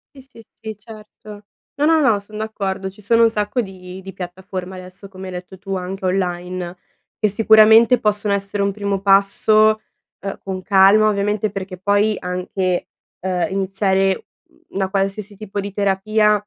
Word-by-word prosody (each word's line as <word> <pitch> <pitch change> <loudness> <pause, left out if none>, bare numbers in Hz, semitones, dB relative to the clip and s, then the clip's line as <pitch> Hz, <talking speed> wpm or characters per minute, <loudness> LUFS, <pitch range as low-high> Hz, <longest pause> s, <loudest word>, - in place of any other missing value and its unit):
Sì, 270 - -12
sì, 250 -4 -17 0.2
sì, 220 -2 -6
certo. 210 -1 -13 0.3
No, 290 - +2
no, 325 -1 +4
no, 225 -8 +3
son 210 +1 -12
d'accordo. 195 -3 -3
Ci 205 +2 -18
sono 230 +3 +3
un 225 - +4
sacco 210 +3 0
di 185 -2 -9
di 195 0 -9
piattaforme 185 0 -7
adesso, 185 +2 -11
come 190 0 -10
hai 185 - -7
detto 180 +1 -8
tu, 195 +1 -6
anche 190 +1 -5
online, 180 -1 -2 0.4
e 215 - +2
sicuramente 220 +3 +6
possono 210 -2 0
essere 200 +1 -3
un 200 0 +1
primo 200 -1 -2
passo, 215 +2 +4 0.4
uhm, 195 0 -5
con 190 -1 -6
calma, 200 +2 +5
ovviamente, 210 +1 0
perché 190 -1 -6
poi 205 +2 +2
anche, 180 0 -2 0.3
uhm, 180 -1 -1
iniziare 195 0 0 0.5
una 190 -1 0
qualsiasi 195 +1 -2
tipo 205 0 -6
di 200 0 -4
terapia 210 +2 +2
200 Hz, 160 wpm, -20 LUFS, 190-215 Hz, 0.5 s, sicuramente